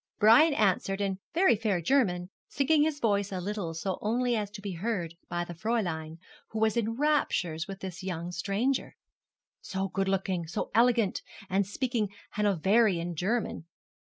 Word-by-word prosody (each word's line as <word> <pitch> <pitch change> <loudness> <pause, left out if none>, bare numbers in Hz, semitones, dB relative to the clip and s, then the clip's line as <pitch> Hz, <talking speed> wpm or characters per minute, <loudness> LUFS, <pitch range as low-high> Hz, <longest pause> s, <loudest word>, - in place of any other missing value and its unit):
Brian 260 +9 +6
answered 195 -2 +1
in 195 -2 -1 0.2
very 365 -7 +5
fair 210 -4 0
German, 180 - +1 0.2
sinking 290 +2 +2
his 300 -1 +1
voice 205 -4 +1
a 185 - -3
little 185 -3 -3
so 185 +4 -2
as - - -8
only 235 0 +1
to 205 +1 -10
be 200 -1 -5
heard 175 -2 -3 0.2
by 175 0 -2
the 175 - -7
Fräulein, 170 -6 -2 0.3
who 220 - -4
was 220 -1 +2
in 230 0 -1
raptures 220 - +1
with 195 -1 -8
this 190 -1 -6
young 175 -2 -4
stranger. 220 +9 -1 0.7
So 190 0 -3
good 195 +1 -1
looking, 190 -3 -1
so 170 - -4
elegant, 235 -3 +3 0.3
and 195 0 +2
speaking 230 -1 -1 0.2
Hanoverian 195 -2 +2
German. 195 +1 -1
200 Hz, 160 wpm, -29 LUFS, 180-230 Hz, 0.7 s, Brian